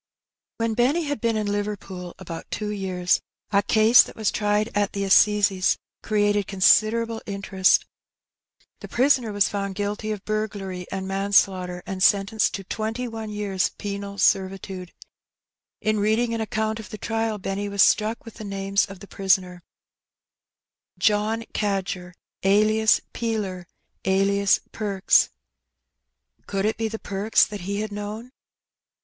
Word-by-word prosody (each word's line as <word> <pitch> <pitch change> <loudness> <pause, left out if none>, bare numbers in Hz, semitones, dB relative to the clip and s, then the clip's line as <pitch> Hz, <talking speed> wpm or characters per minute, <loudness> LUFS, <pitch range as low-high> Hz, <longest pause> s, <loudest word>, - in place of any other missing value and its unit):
When 230 -1 0
Benny 265 +9 +2
had 290 -5 -3
been 230 -2 +1
in 215 - -1
Liverpool 205 -3 -4
about 170 -3 -8
two 210 -1 -3
years, 185 -3 0 0.3
a 200 -1 +4
case 220 +3 +6
that - - -5
was 220 -2 0
tried 210 +1 0
at 205 -1 +1
the 200 - -2
assizes 195 -1 +4 0.2
created 205 -2 +1
considerable 225 +4 +3
interest. 195 -2 +2 0.9
The - - -9
prisoner 250 -3 +2
was 205 -1 +2
found 200 -2 -3
guilty 205 +2 -3
of 205 -2 -5
burglary 200 -4 -3
and 190 0 -4
manslaughter, 190 -2 +1
and 190 -1 -5
sentenced 200 +2 +3
to 195 - -6
twenty 225 +5 -3
one 225 -2 -6
years' 205 -3 -1
penal 200 0 -5
servitude. 190 -2 0 0.9
In 215 0 +1
reading 220 +3 +1
an 230 - -2
account 220 0 -2
of 220 - -9
the 215 - -7
trial, 225 0 -2
Benny 200 +1 -3
was 200 -1 +4
struck 220 +1 +2
with 230 - -10
the 220 - -9
names 195 0 0
of 195 -2 -11
the 200 - -10
prisoner, 190 -2 0 1.4
John 215 +2 +1
Cadger, 190 -3 -2 0.3
alias 215 +3 +4
Peeler, 205 -6 -3 0.4
alias 195 +1 +3
Perks. 200 -3 +2 1.2
Could 195 0 -1
it 215 - 0
be 225 -1 -1
the 220 0 -5
Perks 205 +1 +2
that 205 -2 -7
he 200 +3 -3
had 215 0 -4
known? 210 +4 -6
205 Hz, 140 wpm, -24 LUFS, 195-220 Hz, 1.4 s, case